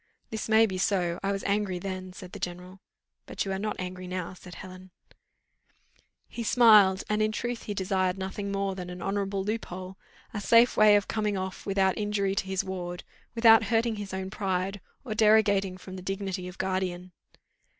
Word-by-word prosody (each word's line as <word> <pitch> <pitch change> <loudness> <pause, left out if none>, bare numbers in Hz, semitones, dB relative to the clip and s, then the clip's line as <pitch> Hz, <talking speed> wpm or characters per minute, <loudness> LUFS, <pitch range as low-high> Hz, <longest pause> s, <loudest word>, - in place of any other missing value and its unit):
"This 220 0 -4
may 220 +1 +6
be 190 -4 -3
so, 180 -4 0
I 195 - 0
was 195 0 -3
angry 200 -2 0
then," 185 0 -5
said 180 0 -11
the - - -8
general. 180 +2 -6 0.5
"But - - -3
you 195 - -3
are 190 - -2
not 210 +1 -2
angry 185 0 -6
now," 180 -1 -4
said 180 -1 -12
Helen. 185 +1 -11 1.4
He 235 - -7
smiled, 215 -5 +6
and 210 0 0
in 215 0 +2
truth 240 +2 -3
he 205 - -4
desired 185 -1 0
nothing 195 +1 -4
more 195 -1 -1
than 180 -1 -7
an 180 -1 -7
honourable 195 0 -1
loophole 190 -3 -5 0.3
a 210 - -3
safe 230 +3 +5
way 215 -1 +7
of 205 -1 +2
coming 210 -2 -1
off 190 +1 -5
without 195 -1 +1
injury 205 -2 0
to 195 0 -2
his 190 -1 -1
ward 180 -1 -5 0.3
without 225 -1 +7
hurting 230 -1 +1
his 205 -1 -6
own 190 0 -4
pride, 195 -1 -2 0.2
or 225 - -3
derogating 210 -3 +3
from 185 0 -9
the - - -7
dignity 190 -1 -4
of 180 +1 -10
guardian. 185 -1 -2
195 Hz, 185 wpm, -28 LUFS, 185-210 Hz, 1.4 s, way